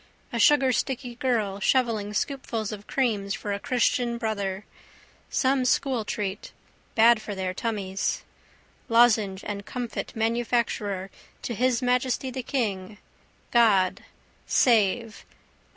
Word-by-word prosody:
A - - -1
sugarsticky 255 -2 +2
girl 215 -6 0
shovelling 220 -3 +1
scoopfuls 230 -5 -2
of 210 -1 -8
creams 210 -7 0
for 205 - -4
a 200 - -3
christian 240 0 +1
brother. 200 -4 -3 0.6
Some 265 0 +2
school 250 -2 +1
treat. 205 -1 -4 0.4
Bad 230 0 +6
for 205 -2 -6
their 185 -1 -2
tummies. 195 -2 -2 0.7
Lozenge 220 -5 +4
and 200 -1 -4
comfit 245 +3 -5
manufacturer 225 -4 -1 0.3
to 240 - -3
His 250 +2 +1
Majesty 250 +1 0
the 260 +1 -4
King. 210 -6 -3 0.5
God. 205 -6 +3 0.4
Save. 225 -1 +2
230 Hz, 110 wpm, -26 LUFS, 200-245 Hz, 0.7 s, Bad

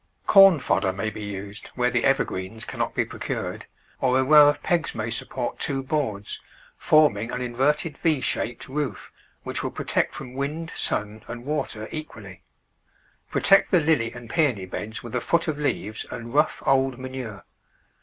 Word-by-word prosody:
Corn 195 -3 +8
fodder 100 -8 +1
may 100 +3 -3
be 110 - -7
used 100 +1 -7
where 125 0 +1
the 120 -1 +1
evergreens 110 -5 0
cannot - - -3
be - - +1
procured, - - -5 0.3
or 130 -1 +3
a 130 - +3
row 150 +1 +8
of 145 - -2
pegs 170 -2 0
may 110 +1 -3
support 120 +2 -4
two 135 -3 -1
boards, 130 -8 -2 0.4
forming 120 -8 +3
a 125 0 -2
A 150 +1 +1
shaped 120 - -2
roof, 130 - -4 0.3
which - - -3
will - - -2
protect - - -1
from 125 - -8
wind, 150 +5 -3
sun, 105 +1 -2
and 120 0 -7
water 125 -7 -2
equally. 105 - -8 0.9
Protect 195 0 +4
the 180 - +5
Lily 150 -7 +2
and 120 -1 -10
Peony 130 - +1
beds 110 +4 -6
with 120 - -8
a 125 - 0
foot 170 +7 +1
of 150 -2 -2
leaves 110 -7 -2
and 115 +1 -7
rough, 150 +2 +2
old 135 -1 +2
manure. 130 -5 -7
125 Hz, 165 wpm, -25 LUFS, 110-150 Hz, 0.9 s, Corn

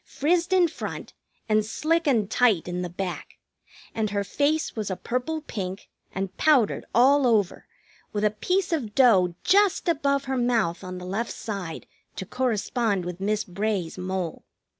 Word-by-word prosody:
Frizzed 340 +5 0
in 365 -2 +5
front, - - -7 0.3
and 215 -1 +3
slick 315 +9 0
and 225 -7 +2
tight 220 -6 +2
in 180 0 -3
the 180 - -3
back; 180 +1 -5 0.6
and 220 -1 -1
her 200 0 -1
face 295 +8 0
was 215 -3 -3
a 185 - -2
purple 250 - -3
pink, 190 -8 -6 0.2
and 190 -1 -4
powdered 270 -9 +3
all 265 +3 +5
over, 210 -6 +1 0.4
with 210 -1 -2
a 210 - +3
piece 360 - 0
of 235 -10 -2
dough 190 -10 +5
just 400 0 +3
above 280 -4 +1
her 265 -1 -2
mouth 230 -8 +1
on 185 0 -6
the 180 - -8
left 215 +6 -2
side 195 -7 -6 0.3
to 190 - -5
correspond 225 -4 -1
with 180 +1 -6
Miss 210 +1 0
Bray's 195 -2 -3
mole. 185 -2 -3
215 Hz, 160 wpm, -25 LUFS, 190-280 Hz, 0.6 s, in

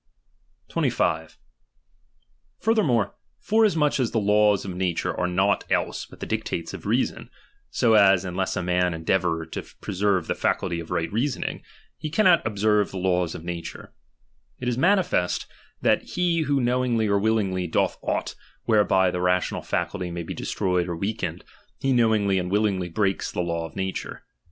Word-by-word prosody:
25. 80 0 0 1.2
Furthermore, 160 - +2 0.3
forasmuch 180 -11 +2
as 125 -3 +1
the 115 - 0
laws 105 -1 +3
of 95 -2 -5
na 90 -1 0
ture - - -2
are 90 - 0
nought 95 +3 +1
else - - -1
but - - -15
the - - -4
dictates 85 - -3
of - - -7
reason; - - 0 0.4
so 115 - +2
as, 95 -3 +5
unless 95 +1 -2
a 90 - -1
man 90 -1 +1
endeavour 80 0 0
to - - -5 0.2
preserve 95 -3 0
the - - -1
faculty 85 -3 -1
of 85 - -8
right 85 +3 -2
reasoning, 125 +4 -2 0.4
he 155 - -4
cannot 180 0 +4
observe 105 -1 +2
the 95 - -7
laws 90 -2 0
of - - -8
nature; 85 -1 -7 0.6
it - - -5
is 125 - +1
manifest, 175 - +2 0.4
that - - +3
he 175 -2 0
who 145 -2 +1
knowingly 125 -2 +1
or 100 0 +2
willingly 100 -4 0
doth - - 0
aught - - -2 0.3
whereby 95 -4 +3
the 90 - -3
rational 90 0 +1
faculty 90 - -2
may 85 0 -4
be - - -6
destroyed 90 -2 -1
or 85 - -2
weakened, 100 +6 -3 0.4
he 135 0 +1
knowingly 110 -5 +3
and 90 0 -3
willingly 100 -3 +1
breaks 95 +2 0
the - - -2
law 85 -1 -2
of - - -18
nature. 95 -1 -4
100 Hz, 160 wpm, -25 LUFS, 90-115 Hz, 1.2 s, as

